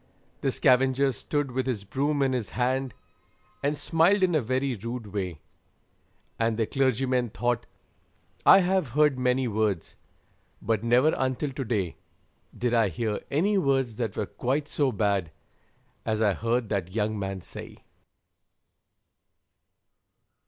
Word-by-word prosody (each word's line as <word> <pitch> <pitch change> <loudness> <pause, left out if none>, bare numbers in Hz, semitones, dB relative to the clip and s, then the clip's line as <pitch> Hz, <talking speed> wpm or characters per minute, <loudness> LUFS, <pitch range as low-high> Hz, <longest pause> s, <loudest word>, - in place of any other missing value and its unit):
The - - 0
scavenger 130 +2 +3
stood 145 +3 -2
with 130 +1 -2
his 115 -6 -2
broom 140 +7 0
in 135 -1 +1
his 125 -5 -2
hand, 130 +1 0 0.7
And 145 +1 0
smiled 175 +7 +3
in 180 -2 +3
a 155 - +3
very 130 +3 -1
rude 115 -1 -6
way; 90 -7 -3 1.0
And 115 -1 +1
the 115 - +1
clergyman 130 -1 +1
thought, 120 +3 -1 0.8
'I 195 - +8
have 185 -3 +1
heard 150 -4 +4
many 125 0 +1
words, 105 -5 -1 0.6
But 110 0 -1
never, 125 +6 +4
until 130 +2 -1
to 135 +1 -4
day, 105 -7 -2 0.6
Did 120 0 0
I 115 -4 +3
hear 105 +4 -2
any 195 +8 +2
words 135 - +1
that 115 -5 -3
were 105 - 0
quite 135 +8 -2
so 140 -3 +1
bad 100 -5 0 0.7
As 110 -1 -1
I 105 -3 +3
heard 115 +2 -1
that 95 -2 -2
young 110 -1 0
man 95 -1 -4
say.' - - -10
125 Hz, 140 wpm, -27 LUFS, 110-135 Hz, 1.0 s, I